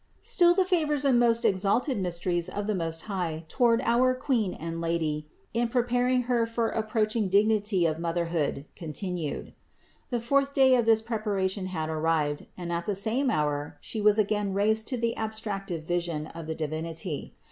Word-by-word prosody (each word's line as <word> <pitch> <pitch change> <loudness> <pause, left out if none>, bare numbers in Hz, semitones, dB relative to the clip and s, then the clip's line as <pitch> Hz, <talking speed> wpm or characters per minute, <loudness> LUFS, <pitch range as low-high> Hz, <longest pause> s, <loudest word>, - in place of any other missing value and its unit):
38. - - -11
Still 345 -1 +5
the 380 - +3
favors 305 -6 +1
and 255 -3 +4
most 235 -1 +3
exalted 205 +8 +2
mysteries 175 -1 -1
of 205 +2 -4
the 215 - 0
Most 165 -3 -2
High 170 -6 -3
toward 230 +4 +3
our 255 +2 +3
Queen 245 -7 0
and 165 +1 -5
Lady 155 -3 -1 0.2
in 235 +1 +1
preparing 245 +1 +1
Her 235 -2 +1
for 230 0 0
approaching 215 -1 0
dignity 205 -2 +3
of 160 -1 0
Motherhood 165 -4 -1
continued. 170 0 -4 0.6
The 240 - 0
fourth 275 +4 +1
day 265 -1 +6
of 240 -2 +3
this 225 -1 +4
preparation 205 -4 -1
had 160 -4 -3
arrived 155 -2 0
and 175 -1 -4
at 170 0 -3
the 205 - 0
same 230 +7 0
hour 150 - -1
She 220 - -4
was 210 0 +4
again 205 -2 0
raised 220 +2 +1
to 255 - -1
the 230 0 0
abstractive 205 -6 -4
vision 170 -2 -2
of 165 0 -9
the 160 - -3
Divinity. 160 +1 -4
200 Hz, 170 wpm, -27 LUFS, 165-235 Hz, 0.6 s, day